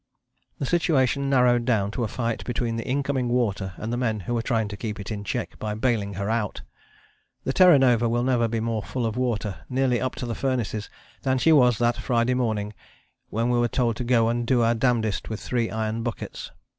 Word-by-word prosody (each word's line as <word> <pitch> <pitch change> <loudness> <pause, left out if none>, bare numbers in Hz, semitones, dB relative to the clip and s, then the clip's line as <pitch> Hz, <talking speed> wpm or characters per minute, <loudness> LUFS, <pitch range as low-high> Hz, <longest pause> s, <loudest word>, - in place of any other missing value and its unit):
The - - -2
situation 140 -4 +1
narrowed 125 -3 +4
down 110 -5 +1
to 120 - -2
a - - 0
fight 115 +1 -3
between 120 -1 -2
the 115 - -4
incoming 135 -2 0
water 105 -6 0
and 115 +2 -4
the - - -1
men 110 -4 -1
who 120 - -3
were 115 - 0
trying 115 -3 0
to 100 - -6
keep 105 0 -5
it 100 +2 -6
in 105 -1 -4
check - - -4
by 105 -1 -3
baling 110 -4 0
her 100 +1 -3
out. 110 -2 -2 0.8
The 130 - -1
Terra 180 -3 +7
Nova 120 -3 +3
will 120 +1 +1
never 125 -2 +2
be 115 0 -2
more 115 -1 -1
full 125 +3 -3
of 110 -1 -2
water, 110 -7 -2
nearly 125 -2 +1
up 130 - -2
to - - -5
the 120 - -3
furnaces, 115 -5 -2 0.3
than 130 -1 +1
she 160 +5 +3
was 125 -6 +5
that 120 0 +1
Friday 120 +1 +1
morning, 110 -4 -1 0.6
when 115 +3 0
we 120 - +2
were 120 - +3
told 120 -1 0
to - - -3
go 120 -2 +3
and 120 0 -1
do 120 -2 +3
our 115 +1 +3
damndest 115 -3 0
with 110 - -4
three 120 -2 -1
iron 110 0 -2
buckets. 120 -1 -5
120 Hz, 220 wpm, -25 LUFS, 110-125 Hz, 0.8 s, Terra